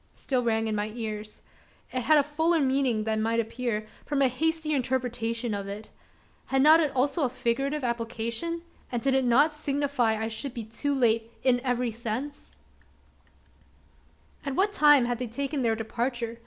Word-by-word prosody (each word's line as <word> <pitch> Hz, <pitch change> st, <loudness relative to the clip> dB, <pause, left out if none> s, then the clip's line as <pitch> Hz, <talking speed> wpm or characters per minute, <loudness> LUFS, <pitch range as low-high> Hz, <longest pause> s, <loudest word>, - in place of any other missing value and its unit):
still 260 Hz, -2 st, -1 dB
rang 225 Hz, -1 st, +1 dB
in 220 Hz, -, -1 dB
my 210 Hz, 0 st, -1 dB
ears. 215 Hz, -2 st, -6 dB, 0.5 s
It 255 Hz, -, 0 dB
had 310 Hz, +5 st, +4 dB
a 290 Hz, -, +5 dB
fuller 320 Hz, +3 st, +1 dB
meaning 260 Hz, -5 st, +1 dB
than 220 Hz, 0 st, 0 dB
might 225 Hz, +1 st, +1 dB
appear, 230 Hz, -1 st, -2 dB, 0.2 s
from 285 Hz, -2 st, 0 dB
a -, -, +6 dB
hasty 320 Hz, +4 st, 0 dB
interpretation 245 Hz, -3 st, -1 dB
of 200 Hz, -1 st, -4 dB
it. 205 Hz, +2 st, -7 dB, 0.6 s
Had 270 Hz, 0 st, +2 dB
not 310 Hz, +2 st, +8 dB
it 305 Hz, -4 st, +1 dB
also 280 Hz, +4 st, +1 dB
a 260 Hz, -, +2 dB
figurative 270 Hz, +4 st, -1 dB
application? 235 Hz, +7 st, -2 dB, 0.3 s
and 240 Hz, -, 0 dB
did 270 Hz, -1 st, +2 dB
it 265 Hz, 0 st, +3 dB
not 280 Hz, +6 st, +4 dB
signify 280 Hz, -6 st, 0 dB
I 220 Hz, -, -1 dB
should 230 Hz, +4 st, -5 dB
be 235 Hz, -, -4 dB
too 255 Hz, +6 st, -2 dB
late 230 Hz, -3 st, +2 dB
in 250 Hz, -2 st, +3 dB
every 250 Hz, -2 st, 0 dB
sense? 235 Hz, +5 st, -5 dB, 1.9 s
At 275 Hz, -2 st, -3 dB
what 405 Hz, +4 st, +2 dB
time 295 Hz, -7 st, +6 dB
had 240 Hz, -1 st, -2 dB
they 250 Hz, -, -3 dB
taken 275 Hz, +4 st, -2 dB
their 230 Hz, -2 st, +2 dB
departure? 235 Hz, +1 st, -3 dB
250 Hz, 170 wpm, -27 LUFS, 230-280 Hz, 1.9 s, not